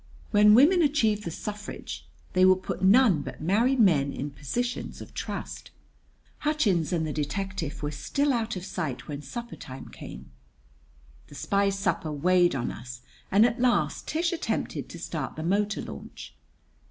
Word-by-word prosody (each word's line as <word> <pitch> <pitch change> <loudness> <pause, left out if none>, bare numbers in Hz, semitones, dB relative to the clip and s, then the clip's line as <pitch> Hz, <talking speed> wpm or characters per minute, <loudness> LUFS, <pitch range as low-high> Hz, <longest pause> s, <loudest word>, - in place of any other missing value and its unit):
When 210 0 +7
women 325 +9 +6
achieve 225 -9 +2
the - - -2
suffrage 205 +5 -6 0.3
they 185 - +4
will 185 0 +7
put 185 0 -5
none 195 - +5
but - - -7
married 225 - +2
men 150 -10 +4
in 145 +2 -4
positions 240 - -3
of - - -10
trust." - - -5 0.7
Hutchins 215 - +1
and 165 -3 0
the 155 - -3
detective 160 -1 -3
were 145 - -1
still 280 - 0
out 230 -2 -1
of 185 0 -5
sight 155 -10 -4
when 145 -1 -5
supper 235 - -7
time 130 -2 -9
came. 65 0 -10 1.0
The 145 - -13
spy's 200 +4 +1
supper 165 -5 -1
weighed 175 +3 +3
on 120 -3 -2
us, 125 0 -9 0.3
and 205 +4 +6
at 240 0 0
last 205 -12 +1
Tish 335 +2 0
attempted 335 - -3
to - - -8
start - - -4
the 155 - -5
motor 205 +4 0
launch. - - -9
190 Hz, 160 wpm, -27 LUFS, 155-230 Hz, 1.0 s, When